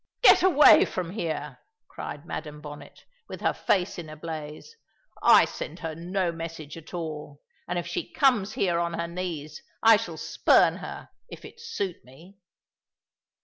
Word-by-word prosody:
"Get - - +8
away 345 -6 +7
from 180 -2 -4
here!" 155 - -4 0.3
cried 145 +2 -8
Madam 150 -3 -6
Bonnet, 145 -1 -11 0.2
with - - -8
her - - +1
face 180 -2 0
in 160 -3 -8
a 155 - -8
blaze. 155 - -8 0.5
"I - - +7
send - - -7
her 160 -2 -4
no 175 +2 -2
message 165 -3 -7
at 165 -1 -12
all; 155 -4 -6 0.3
and 175 - -2
if 175 - -2
she 170 - -4
comes 220 -7 +2
here 175 -3 +1
on 170 0 -1
her 170 0 -3
knees, 170 -4 -5 0.2
I 225 -1 +8
shall 170 -5 -6
spurn - - +3
her, - - -8 0.2
if - - -10
it 465 - -13
suit 200 - -4
me." 165 +10 -17
170 Hz, 160 wpm, -26 LUFS, 155-190 Hz, 0.5 s, Get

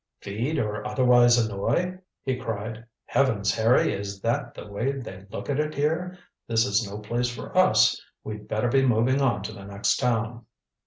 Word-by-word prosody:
"Feed 115 +10 -3
or 105 -1 -2
otherwise 120 0 +5
annoy!" 120 - 0 0.2
he 130 -1 0
cried. 115 -2 -5 0.2
"Heavens, 110 -7 +1
Harry, 115 +2 +3
is 100 0 -5
that 115 +3 -1
the - - -8
way 110 +7 -2
they 100 -8 -8
look - - -6
at 140 0 0
it 150 0 -1
here? 165 +5 -1 0.3
This 115 0 +2
is 100 0 0
no 100 - -6
place 120 +4 -1
for 120 - -8
us. - - +5 0.2
We'd 105 -1 -7
better 110 +3 0
be 135 +2 +3
moving 130 +2 +3
on 115 -7 +1
to 110 - -5
the 100 -2 -10
next 100 +1 0
town." 115 -2 -1
115 Hz, 175 wpm, -26 LUFS, 105-130 Hz, 0.3 s, otherwise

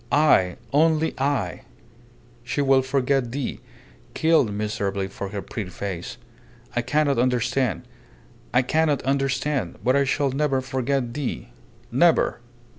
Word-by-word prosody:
"I! 135 - +4 0.2
Only 160 +1 +3
I! 135 - -1 0.8
She 125 +4 -3
will 135 -1 +4
forget 135 -2 0
thee, 135 0 -3 0.6
killed 160 -8 +3
miserably 100 -2 -2
for 100 0 -6
her 100 0 -5
pretty 105 -4 -5
face. 95 -2 -5 0.6
I 120 - +2
cannot 140 +1 +1
understand. 125 0 +1 0.7
I 125 +1 +3
cannot 150 +1 +1
understand. 135 +1 -1
But 130 +2 +3
I 140 0 +3
shall 135 0 +1
never 135 0 +1
forget 130 -1 -1
thee. 125 - -4 0.4
Never!" - - +3
130 Hz, 120 wpm, -24 LUFS, 115-140 Hz, 0.8 s, I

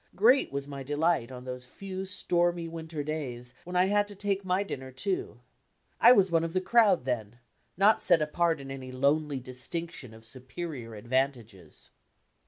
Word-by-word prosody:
Great 245 +8 +4
was 140 0 -4
my 140 -1 -7
delight 145 -2 0
on 125 -1 -8
those 125 -1 -7
few 190 +6 -6
stormy 175 -2 0
winter 160 -2 -5
days 125 -5 -4
when 180 +1 -6
I 180 +1 +5
had 205 +1 +2
to 205 - -11
take 200 0 -1
my 185 +1 +1
dinner, 130 -9 -6
too. 130 - -3 0.6
I 235 - +9
was 195 -7 +5
"one 165 -1 +3
of 165 0 -3
the 185 - +2
crowd" 200 - +4
then, 120 -3 -3 0.4
not 205 +3 +5
set - - +5
apart 160 +1 +1
in 135 0 -8
any 130 -1 -7
lonely 140 +2 +1
distinction 130 +2 -5
of 110 0 -15
superior 130 0 -7
advantages. 115 - -3
150 Hz, 170 wpm, -29 LUFS, 130-185 Hz, 0.6 s, I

